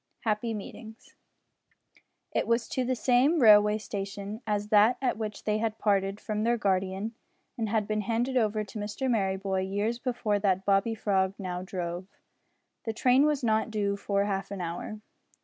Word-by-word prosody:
HAPPY 220 +1 -1
MEETINGS. 220 +2 -10 1.2
It - - 0
was 230 0 +1
to 260 - -1
the 255 +1 0
same 255 +7 +3
railway 210 -3 +7
station 200 +1 -6
as 210 0 -1
that 215 +4 +5
at 260 -2 0
which 215 -1 -5
they 215 0 0
had 220 -1 -1
parted 200 -1 +1
from 215 -1 -3
their 235 +1 +2
guardian 195 +1 -1 0.4
and 220 -2 -1
been 215 0 0
handed 235 +4 -1
over 215 -3 +1
to 210 +1 -8
Mr 210 +6 -3
Merryboy 195 -4 0
years 215 +4 -1
before 235 -5 -1
that 190 -2 +1
Bobby 200 +3 +2
Frog 195 -3 +1
now 180 -3 -4
drove. 180 -1 -5 0.8
The 225 - -2
train 255 +5 +4
was 295 -3 0
not 220 -1 +1
due 205 -2 0
for 200 0 0
half 195 -1 -2
an 200 - -6
hour. 175 +5 -5
210 Hz, 165 wpm, -28 LUFS, 195-230 Hz, 1.2 s, railway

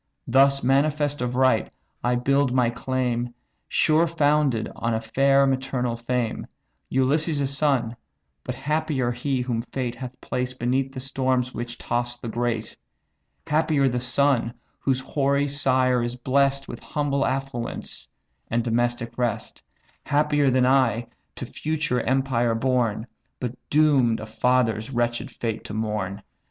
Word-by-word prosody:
Thus 140 +2 +4
manifest 145 +2 +2
of 125 0 -2
right, 130 -3 +3 0.3
I 125 0 +2
build 140 +2 +2
my 125 -2 +3
claim 125 -1 -2 0.3
Sure 160 +2 +3
founded 145 -7 +2
on 115 0 -1
a - - 0
fair 135 +4 +3
maternal 130 -2 -1
fame, 120 0 -2 0.4
Ulysses' 140 +1 +1
son: 135 -5 +1 0.5
but 125 - -4
happier 140 -2 0
he, 125 +2 -1
whom 120 -2 -1
fate 125 0 -4
Hath 125 +1 -8
placed 125 0 -3
beneath 130 +2 0
the 130 - -7
storms 130 -1 -1
which 120 +1 -5
toss 120 0 -2
the 120 - -6
great! 115 -1 -2 0.7
Happier 150 -2 +2
the 125 -1 0
son, 125 -1 +1 0.2
whose 130 -2 0
hoary 140 +1 +1
sire 130 -3 +2
is 120 +1 -2
bless'd 135 +2 +1
With 120 - -7
humble 140 -2 -1
affluence, 135 -3 -3 0.4
and 115 +1 +1
domestic 120 0 -1
rest! 120 -3 -2 0.5
Happier 145 -1 +3
than 130 0 +3
I, 125 -3 +2 0.3
to - - -5
future 150 -5 -1
empire 125 -2 +1
born, 120 -3 0 0.3
But 125 -2 -3 0.2
doom'd 140 -7 +4
a - - -6
father's 115 0 +1
wretch'd 120 0 -1
fate 115 -2 -4
to 105 - -6
mourn!" 105 -3 -3
130 Hz, 135 wpm, -24 LUFS, 120-140 Hz, 0.7 s, Thus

